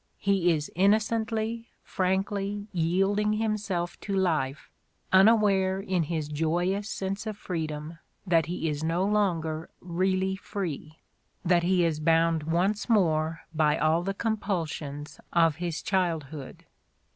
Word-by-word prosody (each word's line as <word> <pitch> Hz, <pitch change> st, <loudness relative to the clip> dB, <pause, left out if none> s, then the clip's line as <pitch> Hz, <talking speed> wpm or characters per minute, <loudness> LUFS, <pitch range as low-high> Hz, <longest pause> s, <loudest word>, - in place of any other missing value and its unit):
He 195 Hz, -3 st, +2 dB
is 150 Hz, -2 st, -2 dB
innocently, 220 Hz, +3 st, +1 dB
frankly 195 Hz, +2 st, -1 dB
yielding 195 Hz, +5 st, +1 dB
himself 210 Hz, -5 st, -2 dB
to 200 Hz, -, -3 dB
life, 155 Hz, -7 st, 0 dB, 0.4 s
unaware 195 Hz, -2 st, +5 dB
in 185 Hz, -2 st, 0 dB
his 155 Hz, -1 st, -2 dB
joyous 175 Hz, +7 st, -1 dB
sense 195 Hz, +3 st, -3 dB
of 215 Hz, -2 st, -4 dB
freedom 160 Hz, -4 st, -5 dB, 0.3 s
that 165 Hz, -4 st, +3 dB
he 170 Hz, -1 st, -2 dB
is 150 Hz, 0 st, -2 dB
no 170 Hz, +4 st, +1 dB
longer 170 Hz, -6 st, 0 dB
really 185 Hz, +2 st, 0 dB
free, 170 Hz, -6 st, -5 dB, 0.5 s
that 175 Hz, 0 st, +4 dB
he 180 Hz, 0 st, +2 dB
is 160 Hz, -2 st, 0 dB
bound 165 Hz, +1 st, +3 dB
once 190 Hz, +8 st, 0 dB
more 165 Hz, -6 st, +2 dB
by 150 Hz, -1 st, +2 dB
all 160 Hz, +2 st, +2 dB
the 195 Hz, +2 st, -3 dB
compulsions 165 Hz, -10 st, -3 dB
of 165 Hz, -3 st, +4 dB
his 170 Hz, -2 st, -3 dB
childhood. 160 Hz, -7 st, -2 dB
180 Hz, 120 wpm, -27 LUFS, 160-200 Hz, 0.5 s, unaware